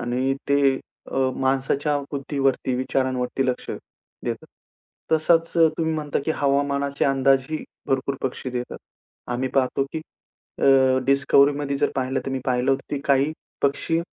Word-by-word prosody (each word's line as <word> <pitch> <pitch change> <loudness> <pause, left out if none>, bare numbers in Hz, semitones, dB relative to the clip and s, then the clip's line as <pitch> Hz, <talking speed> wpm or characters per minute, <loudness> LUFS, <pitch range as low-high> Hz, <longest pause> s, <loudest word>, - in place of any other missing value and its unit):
आणि 125 +2 0
ते 140 -1 +4 0.4
अ, 130 -1 +2
माणसाच्या 135 +2 +1
बुद्धीवरती 135 -2 0
विचारांवरती 130 0 -1
लक्ष 125 - -2 0.5
देतात. - - -4 0.7
तसाच 165 +1 +3
तुम्ही 160 0 +3
म्हणता 150 -2 -2
की - - 0
हवामानाचे 140 0 0
अंदाजही 135 +2 +2 0.2
भरपूर 135 +1 0
पक्षी 130 0 -3
देतात. 125 0 -4 0.5
आम्ही 130 +2 -1
पाहतो 135 0 +2
की 160 - -2 0.6
अ, - - 0 0.4
डिस्कव्हरीमध्ये 140 +1 +3
जर 145 - +2
पाहिलं 130 0 0
तर - - -2
मी 135 - -1
पाहिलं 125 +1 +1
होतं 135 - +1
की 140 - -3
काही 140 +2 +3 0.3
पक्षी 155 +4 +1
135 Hz, 130 wpm, -23 LUFS, 130-145 Hz, 0.7 s, ते